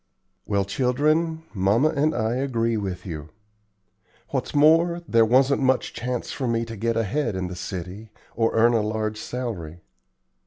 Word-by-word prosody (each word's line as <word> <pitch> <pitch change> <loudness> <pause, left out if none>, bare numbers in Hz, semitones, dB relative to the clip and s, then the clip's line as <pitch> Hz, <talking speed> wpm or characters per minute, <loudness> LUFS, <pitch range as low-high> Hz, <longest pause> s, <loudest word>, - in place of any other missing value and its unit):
"Well, 100 -2 +1
children, 155 - +1
mamma 105 +9 +3
and 155 0 +1
I 110 +1 0
agree 115 -4 0
with 95 -4 -4
you. 80 -4 -6 1.0
What's - - -3
more, 165 +4 +4
there 115 -3 +4
wasn't 135 +4 +3
much 130 -1 +1
chance 125 0 -3
for 130 - -3
me 115 0 0
to 115 0 -7
get 115 +2 -1
ahead 115 +1 -1
in 95 0 -2
the 90 - -6
city, 90 +4 -6 0.3
or 115 -1 +2
earn 115 +2 +5
a 115 - +3
large 110 0 -2
salary. 95 -11 -5
115 Hz, 155 wpm, -24 LUFS, 105-135 Hz, 1.0 s, earn